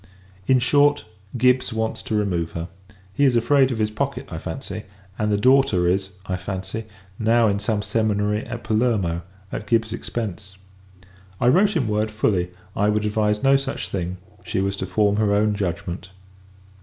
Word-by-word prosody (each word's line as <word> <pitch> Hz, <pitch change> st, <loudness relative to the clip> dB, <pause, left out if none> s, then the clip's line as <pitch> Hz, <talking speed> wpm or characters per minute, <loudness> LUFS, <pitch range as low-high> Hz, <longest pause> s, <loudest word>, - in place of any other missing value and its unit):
In 130 Hz, -, +5 dB
short, 145 Hz, +3 st, +3 dB, 0.3 s
Gibbs 125 Hz, +1 st, +3 dB
wants 110 Hz, 0 st, -2 dB
to 110 Hz, -, -3 dB
remove 85 Hz, -6 st, -1 dB
her. 85 Hz, +1 st, -5 dB, 0.4 s
He 140 Hz, -, +1 dB
is 130 Hz, -3 st, +4 dB
afraid 135 Hz, +3 st, +4 dB
of 120 Hz, -, -2 dB
his 110 Hz, -1 st, 0 dB
pocket, 105 Hz, -, -3 dB
I -, -, -4 dB
fancy; -, -, -6 dB, 0.3 s
and 105 Hz, 0 st, +1 dB
the 105 Hz, -, +2 dB
daughter 125 Hz, -6 st, +4 dB
is, 95 Hz, +2 st, 0 dB
I 90 Hz, -1 st, -2 dB
fancy, 95 Hz, +4 st, -5 dB, 0.3 s
now 115 Hz, +1 st, +4 dB
in 100 Hz, -1 st, +1 dB
some 105 Hz, 0 st, -1 dB
seminary 105 Hz, -1 st, 0 dB
at -, -, -6 dB
Palermo, 110 Hz, -7 st, +1 dB, 0.3 s
at 105 Hz, -, -5 dB
Gibbs's 115 Hz, -1 st, +1 dB
expence. 100 Hz, -4 st, -5 dB, 0.8 s
I 120 Hz, -, +4 dB
wrote 195 Hz, +8 st, +4 dB
him 130 Hz, -7 st, 0 dB
word, 105 Hz, +1 st, 0 dB
fully, 100 Hz, -4 st, 0 dB, 0.3 s
I 105 Hz, +1 st, +2 dB
would 105 Hz, 0 st, +1 dB
advise 105 Hz, +1 st, 0 dB
no 135 Hz, 0 st, +6 dB
such 135 Hz, 0 st, -4 dB
thing; 90 Hz, -1 st, -3 dB, 0.3 s
she -, -, -2 dB
was 100 Hz, +1 st, 0 dB
to -, -, -3 dB
form 105 Hz, -1 st, +2 dB
her 105 Hz, -2 st, +2 dB
own 105 Hz, +1 st, +2 dB
judgment. 90 Hz, -2 st, -4 dB
105 Hz, 170 wpm, -23 LUFS, 100-120 Hz, 0.8 s, no